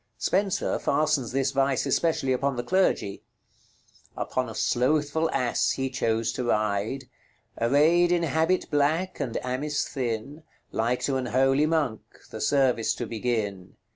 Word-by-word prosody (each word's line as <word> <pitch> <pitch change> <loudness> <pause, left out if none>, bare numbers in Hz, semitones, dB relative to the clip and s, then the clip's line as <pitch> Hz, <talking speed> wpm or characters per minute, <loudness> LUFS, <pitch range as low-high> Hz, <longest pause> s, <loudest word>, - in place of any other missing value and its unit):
Spenser 195 0 0
fastens 145 -4 +1
this 135 +1 0
vice 135 -2 +1
especially 155 -6 +1
upon 135 +1 0
the 120 - -3
clergy, 180 - +1 1.0
"Upon 130 -2 -2
a 110 - -8
slouthfull 145 +8 +1
asse 125 -1 +1
he 135 -1 -2
chose 115 -3 0
to 125 - -4
ryde, 110 +4 0 0.5
Arayd 155 +9 +4
in 175 -1 +2
habit 165 +4 0
blacke, 155 +5 +1
and 130 -6 -2
amis 145 +4 -1
thin, 130 +4 -4 0.3
Like 120 +3 0
to 135 -2 0
an 130 -1 -3
holy 135 +5 +3
monck, 150 -9 0 0.3
the - - -6
service 125 -2 +2
to - - -4
begin. 110 -5 -3
135 Hz, 140 wpm, -26 LUFS, 120-150 Hz, 1.0 s, Arayd